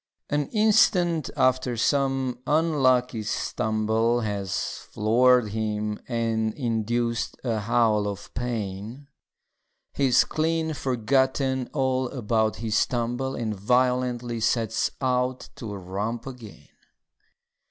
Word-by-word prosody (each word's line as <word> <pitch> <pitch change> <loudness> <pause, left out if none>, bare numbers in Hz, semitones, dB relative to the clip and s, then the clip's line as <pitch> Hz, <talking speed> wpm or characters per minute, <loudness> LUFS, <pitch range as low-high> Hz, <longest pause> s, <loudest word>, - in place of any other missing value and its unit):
An 145 -1 +1
instant 180 - +3
after 130 -1 +2
some 135 -1 +1
unlucky 130 -7 +2
stumble 110 +2 0
Has 100 -4 -2 0.3
floored 120 +2 +3
him 105 0 -2
and 115 -2 -1
induced 115 -1 -1
a 115 -4 0
howl 105 -1 +2
of 100 -1 -7
pain, 115 +2 -4 0.9
He's 130 -2 +4
clean 160 0 -1
forgotten 130 0 0
all 130 -3 0
about 110 -4 0
his 110 -1 +1
tumble 120 +2 -2
And 110 -3 -2
violently 125 +2 0
sets 115 0 +1
out 125 -1 0
to 110 -4 -6
romp 100 +5 -4
again. 120 - -11
120 Hz, 100 wpm, -25 LUFS, 110-130 Hz, 0.9 s, He's